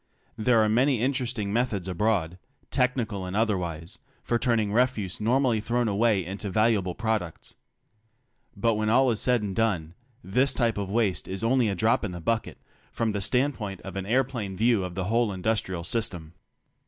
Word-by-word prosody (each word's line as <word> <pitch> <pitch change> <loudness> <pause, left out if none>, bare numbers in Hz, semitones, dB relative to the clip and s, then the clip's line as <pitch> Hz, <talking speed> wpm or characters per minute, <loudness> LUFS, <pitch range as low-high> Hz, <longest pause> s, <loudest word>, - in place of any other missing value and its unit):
There 115 0 +3
are - - +2
many 125 +4 +3
interesting 120 -5 -1
methods 110 -6 0
abroad, 90 -2 0 0.3
technical 120 -6 0
and 90 +1 -5
otherwise, 90 -7 -1 0.2
for 120 - 0
turning 110 -4 +1
refuse 110 -6 0
normally 120 0 +2
thrown 120 +2 0
away 105 -2 +2
into 100 +3 -5
valuable 105 -3 +1
prod 110 -2 0
ucts. 85 -2 -10 1.0
But 115 +3 +2
when 110 0 0
all 130 +2 +4
is 110 - -1
said 125 -3 +2
and 100 -2 -3
done, 90 -8 0 0.3
this 130 +8 +1
type 115 -4 +1
of 100 -2 -3
waste 105 -3 0
is 95 +2 -5
only 120 -1 +3
a 100 - -1
drop 110 +6 +2
in 100 -4 -3
the 85 - -6
bucket 110 +7 -2 0.3
from 115 -1 -1
the 100 -1 -2
standpoint 125 -4 -1
of 95 -1 -8
an 95 0 -4
aeroplane 120 -5 -1
view 115 -2 +3
of 90 -1 -6
the 95 - -2
whole 115 +3 +1
industrial 95 -2 -2
system. 90 -7 -3
110 Hz, 175 wpm, -26 LUFS, 95-120 Hz, 1.0 s, all